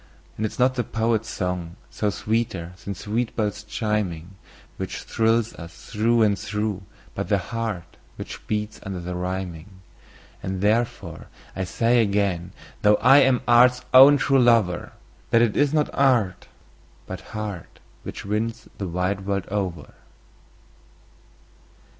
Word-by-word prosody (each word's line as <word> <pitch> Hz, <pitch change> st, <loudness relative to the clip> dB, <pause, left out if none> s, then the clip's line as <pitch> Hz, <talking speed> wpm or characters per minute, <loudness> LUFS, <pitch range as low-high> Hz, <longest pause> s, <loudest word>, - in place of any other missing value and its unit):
And 110 Hz, -, -1 dB
it -, -, -9 dB
is -, -, -12 dB
not 130 Hz, +1 st, +3 dB
the 125 Hz, -1 st, -1 dB
poet's 110 Hz, 0 st, -1 dB
song, 90 Hz, -4 st, -3 dB, 0.2 s
though 105 Hz, -, +2 dB
sweeter 110 Hz, -5 st, -2 dB
than 100 Hz, -, -4 dB
sweet 110 Hz, +5 st, -2 dB
bells 105 Hz, -2 st, -1 dB
chiming, 105 Hz, -5 st, -3 dB, 0.4 s
Which -, -, -5 dB
thrills 115 Hz, 0 st, +1 dB
us 85 Hz, 0 st, -12 dB
through 115 Hz, +1 st, +3 dB
and 100 Hz, -3 st, +2 dB
through, 105 Hz, 0 st, -2 dB, 0.3 s
but -, -, -4 dB
the -, -, +3 dB
heart 115 Hz, -6 st, -5 dB, 0.2 s
which -, -, -9 dB
beats 105 Hz, 0 st, -3 dB
under 95 Hz, -2 st, -5 dB
the 90 Hz, +1 st, -5 dB
rhyming. 90 Hz, -1 st, -4 dB, 0.7 s
And 95 Hz, 0 st, -4 dB
therefore 105 Hz, -6 st, -1 dB, 0.3 s
I 95 Hz, -, -2 dB
say 115 Hz, +5 st, +2 dB
again, 100 Hz, -4 st, 0 dB, 0.3 s
though 105 Hz, 0 st, +5 dB
I 135 Hz, +6 st, +6 dB
am 130 Hz, -2 st, +3 dB
art's 125 Hz, +1 st, +5 dB
own 135 Hz, +3 st, +9 dB
true 135 Hz, +1 st, +3 dB
lover, 115 Hz, -8 st, +2 dB, 0.4 s
That 115 Hz, 0 st, +5 dB
it 110 Hz, -3 st, +1 dB
is 145 Hz, -1 st, +3 dB
not 150 Hz, -1 st, +1 dB
art, 115 Hz, -10 st, +2 dB, 0.6 s
but -, -, -7 dB, 0.2 s
heart, 105 Hz, -5 st, -6 dB, 0.2 s
which -, -, -8 dB
wins 110 Hz, +2 st, -2 dB
the 95 Hz, -, -3 dB
wide 90 Hz, +3 st, -2 dB
world 100 Hz, -2 st, -1 dB
over. 95 Hz, -6 st, -3 dB
105 Hz, 140 wpm, -24 LUFS, 95-115 Hz, 0.7 s, own